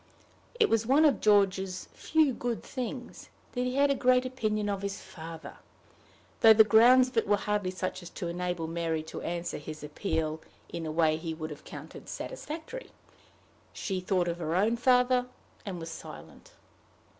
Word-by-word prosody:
It 440 - +6
was 225 0 +1
one 285 +5 +5
of 280 -8 +3
George's 195 -3 +2
few 315 -4 +2
good 240 -1 -3
things 255 -1 -6 0.2
that 250 0 -1
he 250 0 -2
had 280 0 +4
a - - +4
great 255 -1 +3
opinion 215 -5 -1
of 200 -1 -2
his 200 0 -4
father, 165 -1 -10 0.8
though 225 -1 +9
the 220 - +9
grounds 245 +4 +6
of 250 - -10
it 225 - +2
were 205 0 +4
hardly 205 -2 -1
such 185 +1 -4
as 175 - -9
to 180 - -5
enable 175 -1 -2
Mary 165 -1 -2
to 160 - -7
answer 170 -1 -3
his 155 0 -8
appeal 155 0 -2 0.3
in 165 -1 -5
a - - -3
way 155 -1 +2
he 160 0 -5
would 155 -1 -6
have 150 - -10
counted - - -10
satisfactory. 470 +2 -6 0.8
She 190 -3 -3
thought 180 -1 +1
of 170 0 -2
her 165 0 -2
own 210 +5 +3
father, 250 +1 +3 0.4
and 185 -3 -4
was 165 0 -6
silent. - - -11
200 Hz, 175 wpm, -29 LUFS, 170-250 Hz, 0.8 s, though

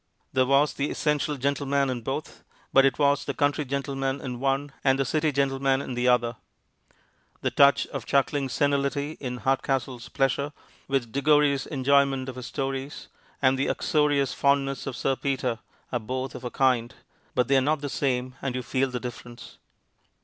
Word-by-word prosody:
There 130 -1 +3
was 140 +2 +3
the 140 +1 -2
essential 150 -1 0
gentleman 140 +1 0
in 120 -2 -4
both, 135 +6 -5 0.3
but 135 0 +7
it 135 - -1
was 145 0 +3
the 140 -2 -4
country 145 +1 +1
gentleman 135 0 -2
in 125 -2 -5
one 135 +2 0
and 135 -1 +4
the 135 - 0
city 155 +3 +1
gentleman 135 -1 +1
in 135 - -5
the 125 +1 0
other. 120 -1 +2 1.0
The - - 0
touch 140 0 +5
of - - -7
chuckling 140 0 +1
senility 140 +1 0
in 125 -2 -4
Hardcastle's 135 -2 -1
pleasure 140 +2 0 0.3
with 135 -4 -1
Diggory's 140 0 +3
enjoyment 135 -1 +2
of 130 - -7
his 125 -1 -7
stories, 135 +1 -4 0.3
and 130 0 +4
the 135 - +1
uxorious 145 -3 +1
fondness 140 -1 +1
of 135 - -4
Sir 135 +2 0
Peter, 130 -4 -2 0.3
are 125 - 0
both 130 +3 -4
of - - -9
a 125 - -3
kind, 125 -1 +1 0.4
but 125 - +2
they 140 - +3
are - - +4
not 150 +2 +1
the 145 - -3
same, 130 -2 -1
and 130 -2 -2
you 125 - -3
feel 135 +2 0
the 125 -1 -3
difference. 120 -1 -9
135 Hz, 175 wpm, -26 LUFS, 130-140 Hz, 1.0 s, but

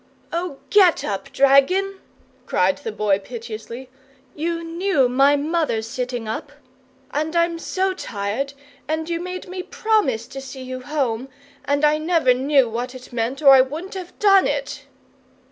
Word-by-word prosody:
"Oh, 340 -4 -3
GET 380 -5 +5
up, 200 -2 -4
dragon," 365 +9 +3 0.5
cried - - +2
the 450 - -5
Boy, 205 - +1
piteously. 230 +3 -8 0.5
"You 335 +2 -3
KNEW 330 -4 +1
my 270 +3 +4
mother's 290 -7 -1
sitting 245 -1 -4
up, 220 - -5 0.6
and 310 +3 -2
I'm 335 0 +1
so 380 +3 -1
tired, 225 - -3 0.3
and 315 +1 -2
you 335 -1 -2
made 365 +1 -6
me 365 0 -5
promise 370 - 0
to 270 - -7
see 265 0 -9
you 255 0 -6
home, 265 -3 -2 0.4
and 285 +1 +2
I 300 +1 +3
never 315 -5 +3
knew 270 0 +3
what 245 +3 -4
it 255 0 -12
meant 240 +5 -2
or 275 - +9
I 265 -1 +9
wouldn't 305 +8 -4
have 370 -2 -8
done 395 -2 +5
it!" - - -4
285 Hz, 155 wpm, -22 LUFS, 250-340 Hz, 0.6 s, or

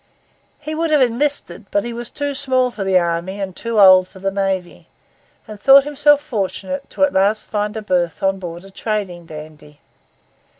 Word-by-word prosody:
He 310 - -6
would 325 +1 -1
have 305 -1 +4
enlisted, 240 -6 -2
but 205 - 0
he 240 - -5
was 235 -1 -6
too 285 -1 -3
small 260 -2 +1
for 220 -4 -5
the 190 -1 +3
army 175 +3 -1
and 190 -2 -5
too 230 -2 -2
old 185 -2 +7
for 190 - -17
the 195 +1 -2
navy; 190 -2 -3 0.6
and 215 -1 -10
thought 275 0 +7
himself 290 0 +3
fortunate 255 +1 -4
at 285 0 +3
last 205 +3 +2
to - - -17
find 210 0 -2
a 220 - -5
berth 175 -4 -1
on 195 0 +1
board 175 0 -8
a 195 - -14
trading 190 -5 -4
dandy. 150 -2 -12
205 Hz, 185 wpm, -19 LUFS, 185-260 Hz, 0.6 s, old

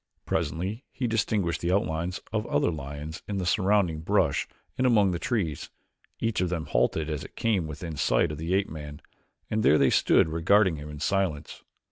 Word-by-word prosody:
Presently 90 - -2
he 130 - -3
distinguished 105 -7 0
the 85 - 0
outlines 90 -1 -1
of 110 -1 -1
other 75 +4 +1
lions 75 +1 -6
in 100 - -3
the 95 - -2
surrounding 95 -3 +2
brush 80 - +1 0.3
and 130 -1 +2
among 105 -6 +4
the 85 - -2
trees. 100 - -2 0.5
Each 115 -4 0
of 90 - +1
them 85 -3 -2
halted 80 -1 +1
as 75 -3 -3
it - - -12
came 100 -8 0
within 80 +2 -6
sight 65 +1 +2
of 75 - -6
the 85 +4 0
ape 100 0 +1
man 75 -2 -8 0.5
and 110 - +1
there 75 -6 +5
they - - +4
stood - - +4
regarding 90 +2 +3
him 75 +1 -8
in 75 -1 -8
silence. 95 -5 -1
85 Hz, 185 wpm, -27 LUFS, 75-100 Hz, 0.5 s, there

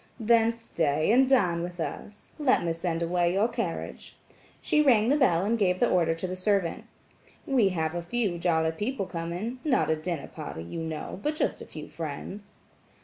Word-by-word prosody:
"Then 230 0 +4
stay 160 -8 0
and 260 +3 +5
dine 180 -11 +3
with 175 0 -6
us. 205 +5 -6
Let 280 - +3
me 165 - 0
send 165 0 -2
away 175 0 +1
your 200 +4 +3
carriage." 230 -8 -5 0.4
She 300 - +2
rang 240 -6 +4
the 285 - +4
bell 190 - +3
and 230 +2 +1
gave 185 -3 +2
the 240 - +3
order 165 -2 +2
to 165 - -4
the 185 0 -3
servant. 185 -2 0 0.6
"We 245 -8 +3
have 160 -3 -1
a 175 - -2
few 195 -1 -1
jolly 160 -2 +2
people 205 +6 -2
coming–not 190 - -1
a - - +3
dinner 155 -1 -4
party, 80 +1 -7
you 85 - -6
know, 160 +2 -5
but 300 +1 -1
just - - -1
a - - -9
few 155 -1 -9
friends." 170 +7 -7
185 Hz, 185 wpm, -27 LUFS, 165-230 Hz, 0.6 s, and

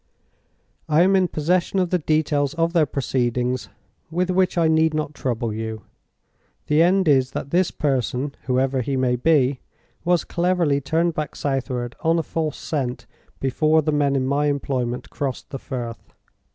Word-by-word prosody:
I 155 +3 +5
am 195 +1 +4
in 185 -1 +3
possession 175 +4 0
of 180 -2 +1
the 180 - +2
details 150 -2 +1
of 165 0 +1
their 160 -4 +3
proceedings, 125 -2 -1 0.4
with 180 +3 0
which 185 -1 +1
I 165 -1 +4
need 160 0 +3
not 150 -1 -2
trouble 120 -5 -2
you. 110 -1 -5 0.8
The 150 +2 +3
end 185 +1 +3
is, 130 -3 +4
that 140 - -5
this 180 +1 +3
person, 135 0 -1
whoever 130 +1 +1
he 135 +2 -2
may 125 -1 +2
be, 135 -1 +2 0.4
was 175 -1 +2
cleverly 170 -5 +1
turned 165 +4 +1
back 155 -1 -4
southward 130 -3 -2
on 165 +1 +2
a 165 - 0
false 155 -2 -3
scent 130 -5 -3 0.3
before 155 +4 +2
the 155 - +1
men 145 -2 +2
in 130 -1 +1
my 140 +2 +1
employment 130 -4 -2
crossed 135 -3 -4
the 135 - -5
Firth. 120 -3 -7
145 Hz, 165 wpm, -22 LUFS, 130-165 Hz, 0.8 s, I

